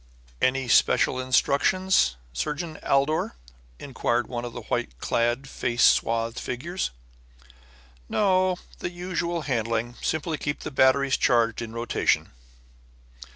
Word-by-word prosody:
"Any 130 Hz, 0 st, +1 dB
special 130 Hz, +2 st, +3 dB
instructions, 140 Hz, -, +2 dB, 0.2 s
Surgeon 155 Hz, -, -4 dB
Aldor?" 140 Hz, -, +1 dB, 0.4 s
inquired 120 Hz, -, -1 dB
one 120 Hz, 0 st, -5 dB
of 120 Hz, -, -7 dB
the -, -, -6 dB
white 60 Hz, -, -3 dB
clad, 120 Hz, -, 0 dB
face 120 Hz, -2 st, -1 dB
swathed 115 Hz, 0 st, +3 dB
figures. 170 Hz, +9 st, -3 dB, 1.2 s
"No. 185 Hz, -2 st, +2 dB, 0.2 s
The -, -, -3 dB
usual 175 Hz, -2 st, -3 dB
handling. 115 Hz, -3 st, -1 dB
Simply 160 Hz, -1 st, -2 dB
keep 145 Hz, 0 st, -3 dB
the -, -, -5 dB
batteries 135 Hz, 0 st, +3 dB
charged 115 Hz, -2 st, +2 dB
in 115 Hz, -1 st, -6 dB
rotation." 115 Hz, +1 st, 0 dB
130 Hz, 110 wpm, -25 LUFS, 120-160 Hz, 1.2 s, special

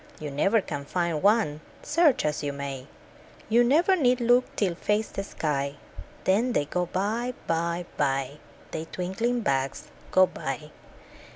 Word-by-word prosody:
You 150 Hz, -2 st, -5 dB
never 195 Hz, +10 st, +3 dB
can 145 Hz, -6 st, -5 dB
find 170 Hz, -1 st, -1 dB
one, 200 Hz, -8 st, +3 dB, 0.2 s
search 300 Hz, -, +3 dB
as 150 Hz, 0 st, 0 dB
you 145 Hz, -1 st, -2 dB
may; 140 Hz, -2 st, -6 dB, 0.6 s
You 235 Hz, +2 st, +5 dB
never 325 Hz, +10 st, +4 dB
need 255 Hz, -7 st, +3 dB
look, 245 Hz, +1 st, +4 dB
till 190 Hz, -4 st, +1 dB
fades 210 Hz, +5 st, -1 dB
the 195 Hz, -, -3 dB
sky 140 Hz, -6 st, -2 dB, 0.5 s
Then 225 Hz, +6 st, +2 dB
they 145 Hz, -, +1 dB
go 180 Hz, +4 st, -1 dB
by. 225 Hz, +7 st, -1 dB
By, 170 Hz, +1 st, -1 dB
By 135 Hz, 0 st, 0 dB, 0.3 s
The 160 Hz, -, -4 dB
twinkling 210 Hz, +9 st, -2 dB
bugs 135 Hz, -, -1 dB, 0.2 s
go 185 Hz, 0 st, +6 dB
by. 150 Hz, -2 st, -5 dB
180 Hz, 150 wpm, -27 LUFS, 145-230 Hz, 0.6 s, go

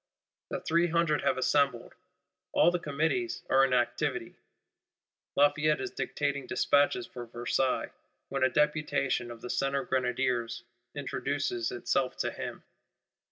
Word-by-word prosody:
The -, -, -3 dB
Three 170 Hz, +2 st, +2 dB
Hundred 165 Hz, -2 st, +2 dB
have 130 Hz, -, +1 dB
assembled; 140 Hz, -2 st, +1 dB, 0.6 s
"all 175 Hz, -, +5 dB
the 180 Hz, -, -1 dB
Committees 160 Hz, -, -1 dB
are 135 Hz, 0 st, +6 dB
in 135 Hz, -, +2 dB
activity;" 120 Hz, -1 st, 0 dB, 1.0 s
Lafayette 150 Hz, +1 st, +3 dB
is 130 Hz, -, -4 dB
dictating 140 Hz, -2 st, -2 dB
despatches 145 Hz, -4 st, +2 dB
for 120 Hz, -1 st, -9 dB
Versailles, 120 Hz, +2 st, -1 dB, 0.4 s
when 135 Hz, -1 st, -3 dB
a 130 Hz, -, +5 dB
Deputation 145 Hz, -3 st, +1 dB
of 115 Hz, -1 st, -9 dB
the 125 Hz, -, -7 dB
Centre 135 Hz, 0 st, 0 dB
Grenadiers 125 Hz, -2 st, -1 dB, 0.3 s
introduces 140 Hz, -4 st, -2 dB
itself 130 Hz, +1 st, -1 dB
to -, -, -1 dB
him. -, -, -6 dB
135 Hz, 125 wpm, -30 LUFS, 125-150 Hz, 1.0 s, are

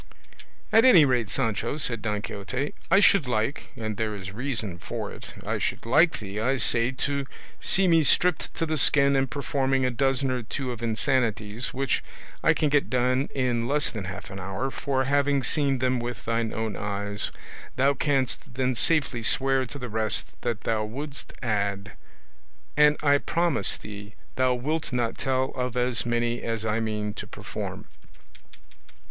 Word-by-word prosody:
"At 225 Hz, -, +7 dB
any 180 Hz, -, +8 dB
rate, 125 Hz, -6 st, +1 dB
Sancho," 115 Hz, +3 st, -1 dB
said 115 Hz, -7 st, 0 dB
Don 105 Hz, -1 st, -2 dB
Quixote, 125 Hz, +8 st, -4 dB, 0.2 s
"I 195 Hz, -, +6 dB
should 200 Hz, -8 st, +5 dB
like 120 Hz, +3 st, -1 dB
and 110 Hz, -4 st, -4 dB
there 110 Hz, -1 st, -2 dB
is 95 Hz, -1 st, -7 dB
reason 110 Hz, -6 st, -2 dB
for -, -, -5 dB
it -, -, -10 dB
I -, -, -1 dB
should -, -, -2 dB
like 155 Hz, +8 st, +4 dB
thee, 100 Hz, 0 st, -6 dB
I 130 Hz, +5 st, +1 dB
say, 120 Hz, -1 st, +2 dB
to 140 Hz, +1 st, -2 dB, 0.3 s
see 190 Hz, 0 st, +4 dB
me 165 Hz, -2 st, +5 dB
stripped 175 Hz, +3 st, +2 dB
to 165 Hz, -, -1 dB
the 155 Hz, -1 st, -1 dB
skin 140 Hz, 0 st, +6 dB
and 135 Hz, -1 st, +1 dB
performing 135 Hz, -2 st, 0 dB
a 125 Hz, -, +1 dB
dozen 135 Hz, +1 st, +1 dB
or 125 Hz, -1 st, -1 dB
two 125 Hz, +3 st, -4 dB
of 120 Hz, -2 st, -7 dB
insanities, 115 Hz, -1 st, 0 dB
which 135 Hz, -1 st, -1 dB, 0.4 s
I -, -, +4 dB
can 150 Hz, -, +1 dB
get 145 Hz, 0 st, +2 dB
done 130 Hz, +2 st, +1 dB
in 120 Hz, -3 st, 0 dB
less 145 Hz, +2 st, +1 dB
than 105 Hz, -4 st, -5 dB
half 95 Hz, +2 st, -7 dB
an 95 Hz, -, -7 dB
hour; 95 Hz, +8 st, -3 dB
for 130 Hz, -1 st, -1 dB
having 140 Hz, 0 st, +2 dB
seen 140 Hz, -2 st, +2 dB
them 130 Hz, 0 st, +1 dB
with 120 Hz, -2 st, -5 dB
thine 115 Hz, 0 st, 0 dB
own 110 Hz, -2 st, -3 dB
eyes, 100 Hz, 0 st, -2 dB, 0.4 s
thou 135 Hz, +2 st, +3 dB
canst 135 Hz, -4 st, -1 dB
then 130 Hz, 0 st, +1 dB
safely 140 Hz, -2 st, +1 dB
swear 135 Hz, +3 st, +2 dB
to 145 Hz, -, -7 dB
the 125 Hz, -2 st, -5 dB
rest 110 Hz, -1 st, 0 dB
that 120 Hz, -3 st, -2 dB
thou 110 Hz, -1 st, 0 dB
wouldst 140 Hz, +6 st, -7 dB
add; 100 Hz, -3 st, -1 dB, 0.8 s
and 150 Hz, 0 st, +5 dB
I 145 Hz, -1 st, +4 dB
promise 170 Hz, -1 st, +1 dB
thee 105 Hz, +1 st, -10 dB, 0.2 s
thou 130 Hz, -1 st, +2 dB
wilt 150 Hz, +6 st, -2 dB
not 120 Hz, -2 st, -1 dB
tell 130 Hz, 0 st, 0 dB
of 125 Hz, -1 st, -3 dB
as 125 Hz, -1 st, +1 dB
many 120 Hz, 0 st, 0 dB
as 115 Hz, -1 st, -3 dB
I 110 Hz, +1 st, 0 dB
mean 105 Hz, -2 st, -2 dB
to -, -, -7 dB
perform." -, -, -7 dB
125 Hz, 175 wpm, -26 LUFS, 110-140 Hz, 0.8 s, any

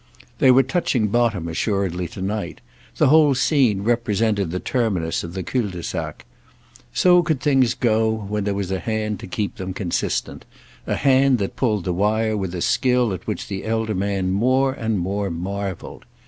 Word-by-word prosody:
They 130 Hz, -, +5 dB
were 130 Hz, +1 st, +6 dB
touching 130 Hz, -, 0 dB
bottom 110 Hz, -6 st, +1 dB
assuredly 90 Hz, 0 st, -1 dB
tonight; 100 Hz, +4 st, -4 dB, 0.4 s
the -, -, +4 dB
whole 150 Hz, -2 st, +5 dB
scene 125 Hz, -8 st, +2 dB
represented 110 Hz, -4 st, +1 dB
the 90 Hz, +2 st, -3 dB
terminus 95 Hz, -11 st, -1 dB
of 85 Hz, +2 st, -7 dB
the 95 Hz, -, -3 dB
cul 125 Hz, 0 st, -1 dB
de 90 Hz, -2 st, -7 dB
sac. -, -, -5 dB, 0.7 s
So 180 Hz, -, +5 dB
could 160 Hz, -5 st, -1 dB
things 130 Hz, -5 st, +2 dB
go 110 Hz, -3 st, +2 dB
when 105 Hz, -1 st, -3 dB
there 100 Hz, -1 st, -1 dB
was 100 Hz, -2 st, -3 dB
a 95 Hz, -, -1 dB
hand 110 Hz, -2 st, -2 dB
to -, -, -8 dB
keep 105 Hz, +4 st, -3 dB
them 95 Hz, -2 st, -5 dB
consistent—a 90 Hz, -5 st, -4 dB
hand 135 Hz, -1 st, +3 dB
that 100 Hz, -3 st, -3 dB
pulled 105 Hz, -7 st, 0 dB
the 90 Hz, -, -1 dB
wire 110 Hz, +4 st, +1 dB
with 95 Hz, -3 st, -3 dB
a 85 Hz, -, -4 dB
skill 125 Hz, -2 st, +2 dB
at 90 Hz, -, -8 dB
which -, -, -3 dB
the 95 Hz, -1 st, -5 dB
elder 110 Hz, 0 st, -1 dB
man 95 Hz, -1 st, -1 dB
more 130 Hz, +6 st, +2 dB
and 110 Hz, -4 st, -2 dB
more 100 Hz, +3 st, -2 dB
marvelled. 95 Hz, +2 st, -5 dB
105 Hz, 175 wpm, -22 LUFS, 95-120 Hz, 0.7 s, were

